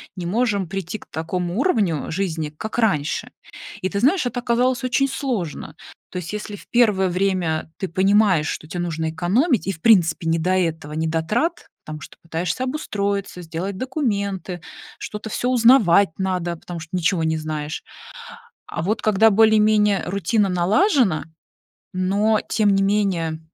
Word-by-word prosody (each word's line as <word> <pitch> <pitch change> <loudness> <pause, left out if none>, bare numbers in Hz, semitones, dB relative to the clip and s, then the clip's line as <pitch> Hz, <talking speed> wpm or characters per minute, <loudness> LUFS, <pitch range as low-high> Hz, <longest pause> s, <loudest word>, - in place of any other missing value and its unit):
не 180 -3 -5
можем 200 0 0
прийти 195 +3 -4
к - - -16
такому 175 +4 -3
уровню 210 - +1
жизни, 160 -4 -2
как 215 +10 -6
раньше. 160 -10 0 0.5
И 185 - -1
ты 200 - -2
знаешь, 285 - +3
это 245 0 -2
оказалось 245 +2 +1
очень 275 +2 +2
сложно. 195 - -4 0.4
То - - -6
есть 175 -1 -5
если 210 0 -5
в - - -14
1 210 -6 +3
время 180 -4 -1
ты 190 - -3
понимаешь, 190 -2 +3
что 155 - -5
те 175 - -5
нужно 160 -2 -2
экономить, 220 - +1
и, 195 - 0
в 160 - -13
принципе, 170 -7 +4
не 165 0 +2
до 180 +3 0
этого, 165 -5 -1
не 160 +1 -1
до 160 0 0
трат, 300 - -1 0.2
потому 155 0 -7
что - - -11
пытаешься 165 +6 -3
обустроиться, 200 - -3
сделать 175 +4 -5
документы, 200 - -2 0.4
что-то 210 +1 -6
всё 245 +3 -1
узнавать 230 -7 +5
надо, 180 -3 -1
потому 170 +1 -8
что 160 -1 -10
ничего 175 -1 +1
не 160 0 0
знаешь. 155 0 -4 0.8
А - - -4
вот 210 +6 -1
когда 215 +1 +4
более-менее 215 -1 +4
рутина 200 +3 +1
налажена, 190 - +2 0.7
но, 200 +4 +2
тем 210 -3 +3
не 195 - +2
менее, 190 -6 0
190 Hz, 160 wpm, -22 LUFS, 165-220 Hz, 0.8 s, узнавать